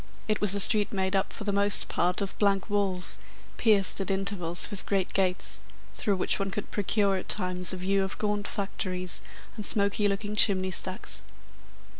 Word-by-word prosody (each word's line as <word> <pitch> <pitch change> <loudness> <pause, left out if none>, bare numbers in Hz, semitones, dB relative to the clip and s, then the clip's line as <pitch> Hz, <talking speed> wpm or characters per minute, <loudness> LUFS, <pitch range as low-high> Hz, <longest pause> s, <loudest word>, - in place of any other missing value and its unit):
It 215 -1 -1
was 205 -1 +4
a - - +1
street 210 +1 +6
made 190 -1 -2
up 195 +1 0
for - - -8
the 205 -1 -2
most 200 0 +4
part 180 +3 -1
of 195 - -4
blank 200 0 0
walls, 195 -3 -2 0.4
pierced 205 -4 +2
at 195 - -4
intervals 190 -2 0
with 205 - -2
great 195 -2 -1
gates, 185 -1 0 0.3
through 205 -4 -1
which 185 - 0
one 195 0 -2
could 210 +1 -6
procure 200 -1 0
at 185 - -8
times 180 -2 +3
a 185 - -5
view 195 +2 0
of 190 - -5
gaunt 210 -1 -2
factories 185 -2 -4 0.3
and 215 - -6
smoky 200 0 +1
looking 205 +1 -3
chimney 190 -3 +3
stacks. 185 +1 -3
195 Hz, 180 wpm, -27 LUFS, 185-205 Hz, 0.4 s, street